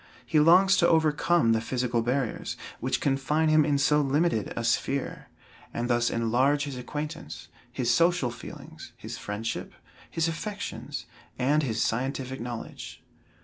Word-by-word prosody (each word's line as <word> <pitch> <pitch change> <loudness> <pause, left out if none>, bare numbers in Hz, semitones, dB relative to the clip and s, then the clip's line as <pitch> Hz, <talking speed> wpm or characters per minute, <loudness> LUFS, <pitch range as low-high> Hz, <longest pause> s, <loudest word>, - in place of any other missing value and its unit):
He 155 - +2
longs 185 +5 +6
to 170 - +4
overcome 160 -3 +3
the 110 -1 +2
physical 120 0 -1
barriers, 125 +1 -2 0.2
which - - -1
confine 150 +3 +1
him 155 0 +5
in 145 -1 +1
so 150 +2 +3
limited 145 - +1
a 120 - -3
sphere, 135 +4 -1 0.5
and 120 +1 -1
thus 120 0 +2
enlarge 130 +6 +2
his 140 -2 -5
acquaintance, 150 +6 -6 0.2
his 120 -1 +1
social 170 -6 +2
feelings, - - -11
his - - -7
friendship, 105 +3 -4 0.4
his 165 0 0
affections 200 +5 -5 0.3
and 145 +4 +2
his 115 -6 0
scientific 130 +2 -2
knowledge. 120 -1 -7
135 Hz, 140 wpm, -27 LUFS, 120-155 Hz, 0.5 s, longs